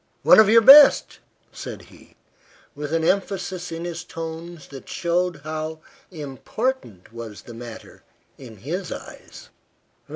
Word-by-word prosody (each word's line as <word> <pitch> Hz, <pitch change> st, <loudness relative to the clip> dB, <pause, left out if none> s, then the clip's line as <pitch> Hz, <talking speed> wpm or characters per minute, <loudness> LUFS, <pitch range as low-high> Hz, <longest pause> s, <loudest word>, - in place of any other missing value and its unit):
"One -, -, +7 dB
of 215 Hz, -2 st, +6 dB
your 230 Hz, +1 st, +6 dB
best," 280 Hz, +4 st, +7 dB, 0.3 s
said -, -, -9 dB
he, -, -, -20 dB, 0.6 s
with 145 Hz, 0 st, -7 dB
an 165 Hz, 0 st, 0 dB
emphasis 190 Hz, -1 st, -2 dB
in 165 Hz, +1 st, -6 dB
his 170 Hz, -1 st, -6 dB
tones 165 Hz, 0 st, -8 dB
that 135 Hz, -2 st, -12 dB
showed 175 Hz, -1 st, -1 dB
how 155 Hz, 0 st, -5 dB, 0.3 s
important 150 Hz, -, -5 dB
was 115 Hz, -4 st, -9 dB
the 120 Hz, -, -11 dB
matter 115 Hz, -1 st, -11 dB, 0.3 s
in 115 Hz, -5 st, -13 dB
his 170 Hz, -, -5 dB
eyes. -, -, -11 dB
165 Hz, 130 wpm, -22 LUFS, 135-180 Hz, 0.6 s, One